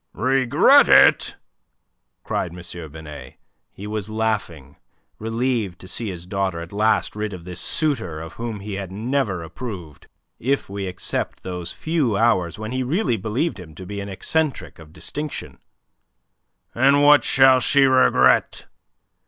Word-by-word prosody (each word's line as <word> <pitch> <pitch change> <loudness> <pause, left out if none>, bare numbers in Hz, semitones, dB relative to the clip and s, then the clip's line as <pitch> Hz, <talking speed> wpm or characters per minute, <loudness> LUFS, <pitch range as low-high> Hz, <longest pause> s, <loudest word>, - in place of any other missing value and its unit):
"Regret 130 0 +4
it?" - - +5 0.9
cried 85 0 -3
M. 85 -3 -9
Binet. 75 -4 -10 0.4
He 100 - -10
was 105 -1 -4
laughing, 110 -10 -3 0.4
relieved 115 -4 -2
to 95 - -13
see 110 +3 -3
his 90 -2 -7
daughter 95 -2 -2
at 85 +3 -9
last 110 +1 +1
rid 105 -1 -3
of 90 -2 -9
this 90 +1 -7
suitor 110 - -1
of 80 +1 -8
whom 115 -3 -6
he 105 +1 -6
had 95 -1 -5
never 110 -3 -2
approved, 85 - -8 0.3
if 135 +4 -1
we 100 0 -5
except 90 0 -4
those 90 -2 -4
few 150 -10 -1
hours 95 -7 +1
when 110 +1 -6
he 130 +1 -2
really 135 - 0
believed 110 - -2
him 80 -4 -12
to 95 - -9
be 100 +2 -6
an 100 0 -6
eccentric 150 - -2
of 80 -1 -14
distinction. 140 - -6 1.1
"And 140 +4 +4
what 145 0 +6
shall 130 -1 +5
she 140 +3 +4
regret? 65 - +3
105 Hz, 145 wpm, -22 LUFS, 90-125 Hz, 1.1 s, what